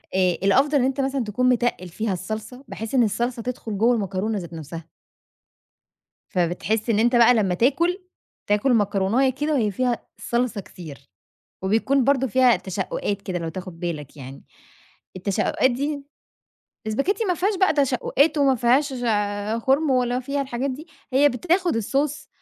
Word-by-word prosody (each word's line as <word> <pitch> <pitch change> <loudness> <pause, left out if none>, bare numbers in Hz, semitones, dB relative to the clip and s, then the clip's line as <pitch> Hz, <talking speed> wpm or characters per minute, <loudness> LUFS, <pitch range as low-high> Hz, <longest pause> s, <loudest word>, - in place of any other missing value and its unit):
آآ، 185 -1 +3
الأفضل 275 +9 +3
إن 255 - +2
أنت 270 +1 0
مثلًا 270 -1 -1
تكون 250 +4 +1
متقِّل 240 -7 0
فيها 215 +3 -2
الصلصة، 215 +7 -6
بحيث 225 +4 -5
إن 245 - +5
الصلصة 235 +3 -1
تدخل 230 -4 -5
جوَّه 235 +4 +4
المكرونة 200 +1 -2
ذات 170 -1 -9
نفسها. 165 +1 -8 1.4
فبتحس 195 +6 -1
إن 210 - +2
أنت 240 +2 +3
بقى 240 +1 +6
لمَّا 195 -5 +1
تاكل، 335 - +2 0.5
تاكل 210 +5 +2
مكروناية 210 +5 +2
كده 295 +4 -2
وهي 220 -6 +1
فيها 245 +3 -1
صلصة 235 -3 -1
كتير، 150 -7 -12 0.5
وبيكون 230 +7 +2
برضه 270 -1 +2
فيها 250 -1 +4
تشقُّقات 190 +2 -3
كده 180 -3 -3
لو 165 -1 -4
تاخد 180 0 -8
بالك 155 -4 -5
يعني، 135 0 -10 0.7
التشقُقات 200 +7 +1
دي 285 +3 -3 0.8
الإسباجيتّي 305 - 0
ما 360 -3 +1
فيهاش 395 +5 0
بقى 380 - +4
تشقُقات 285 +2 +2
وما 275 -2 +4
فيهاش، 260 +5 +2 0.7
خُرم 275 +2 +2
ولا 250 -1 +1
فيها 280 +2 -2
الحاجات 265 +1 -3
دي، 295 +6 -8 0.3
هي 285 +3 +5
بتاخد 345 +4 0
الSauce 290 +6 -2
240 Hz, 150 wpm, -23 LUFS, 195-275 Hz, 1.4 s, بقى